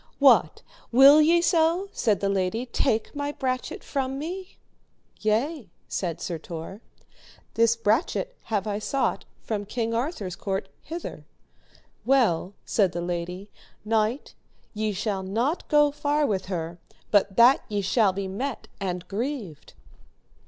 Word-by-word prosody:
What, 240 - +4 0.3
will 275 +5 +8
ye 340 +2 +4
so, 340 +3 +2
said 210 -4 +1
the 200 - +1
lady, 195 +4 0
take 230 -1 0
my 285 0 -2
brachet 255 -3 -3
from 270 -1 -2
me? 360 +6 -6 0.6
Yea, 230 - 0 0.2
said 170 -4 -3
Sir 170 -3 -4
Tor, 165 +6 -8 0.7
this 230 0 +3
brachet 235 - 0
have 210 -3 -1
I 205 -1 -2
sought 270 +5 -1 0.2
from 210 -2 -2
King 225 +2 -2
Arthur's 230 - -2
court 195 +1 -3
hither. 335 +2 -7 0.8
Well, 210 -8 +2
said 195 -5 +2
the 175 - -3
lady, 180 +3 -4 0.3
knight, 220 +4 0 0.4
ye 215 0 -1
shall 200 0 -2
not 230 - -1
go 295 -1 +4
far 295 +1 0
with 195 -8 -1
her, 170 -2 -4 0.3
but 200 -1 +3
that 240 +3 +7
ye 205 -1 -1
shall 200 +1 +3
be 195 +1 -4
met 235 +6 -4
and 180 -3 -3
grieved. 210 - -5
220 Hz, 135 wpm, -26 LUFS, 195-275 Hz, 0.8 s, will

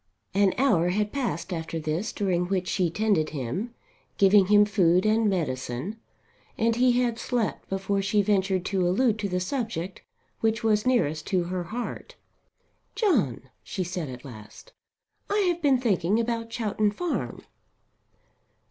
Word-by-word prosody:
An 195 -1 +3
hour 205 -10 +3
had 210 +3 0
passed 255 -8 -2
after 165 -1 -4
this 160 +7 -2
during 180 -3 0
which 185 -1 -1
she 180 -3 +1
tended 195 -4 +1
him, 155 - -4 0.4
giving 195 -1 +5
him 210 0 +6
food 185 -3 +3
and 215 0 +3
medicine, 145 - -3 0.6
and 230 0 +2
he 250 +1 +4
had 235 -1 -1
slept 240 -3 -2
before 195 +1 -1
she 205 +1 +2
ventured 190 -2 +1
to 190 -1 0
allude 220 +4 +2
to 205 -1 -2
the 180 0 0
subject 190 -4 -3 0.4
which 225 +1 0
was 215 +1 +2
nearest 160 - +1
to 185 -3 +1
her 180 0 -3
heart. 240 +6 -6 0.8
"John," 185 - +1
she 185 - -4
said 175 -4 -4
at 125 0 -9
last, 110 -5 -12 0.6
"I 410 - +1
have 350 -3 +1
been 280 -3 +4
thinking 205 -3 +1
about 230 0 -2
Chowton 215 -2 0
Farm." 335 +12 -3
200 Hz, 150 wpm, -26 LUFS, 175-225 Hz, 0.8 s, him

